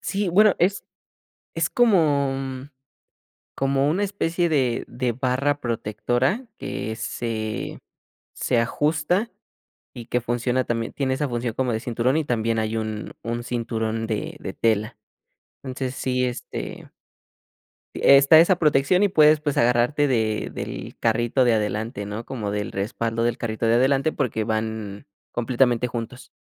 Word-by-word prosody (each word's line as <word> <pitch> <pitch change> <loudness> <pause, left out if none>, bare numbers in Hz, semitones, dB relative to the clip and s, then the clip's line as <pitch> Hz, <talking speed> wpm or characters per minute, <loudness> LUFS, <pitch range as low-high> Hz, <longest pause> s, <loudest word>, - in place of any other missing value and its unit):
Sí, 200 -1 -1
bueno, 205 +3 +5
es 195 +3 +1 0.7
es - - 0
como 140 - +1 0.9
como 135 +1 +1
una 190 +6 +1
especie 175 -4 0
de 130 -6 +1
de 125 -1 -2
barra 130 +4 0
protectora 120 - -1
que 110 - -4
se 110 -1 -4 0.5
se 120 - 0
ajusta 155 - 0 0.6
y 120 -3 -8
que 125 0 -1
funciona 120 +2 0
también 115 -1 -3
tiene 130 -2 -1
esa 145 +1 -1
función 120 -2 -2
como 125 -2 -1
de 110 - -1
cinturón 120 +4 0
y 160 - +1
también 115 -3 0
hay 110 +1 -1
un 110 -1 -4
un 120 +1 -3
cinturón 115 -2 -2
de 110 -2 -3
de - - -6
tela. 110 -1 0 0.7
Entonces, 130 -1 -4
sí, 125 -1 -1
este 125 -1 -6 1.1
está 140 +3 +7
esa 175 +2 +4
protección 150 +4 +3
y 205 - +4
puedes, 155 -3 +5
pues 150 -2 -1
agarrarte 125 +5 +3
de 110 -4 0
del - - -6
carrito 120 +3 +2
de 120 - +4
adelante, 105 -1 -2
¿no?, 105 +3 -5
como 110 -6 -4
del 105 0 -3
respaldo 115 +3 -2
del 120 0 +1
carrito 115 0 -2
de 115 - +4
adelante, 135 +5 +2
porque 110 -3 -1
van 110 -2 -3 0.2
completamente 120 0 +1
juntos. 120 +1 -7
125 Hz, 140 wpm, -23 LUFS, 115-140 Hz, 1.1 s, está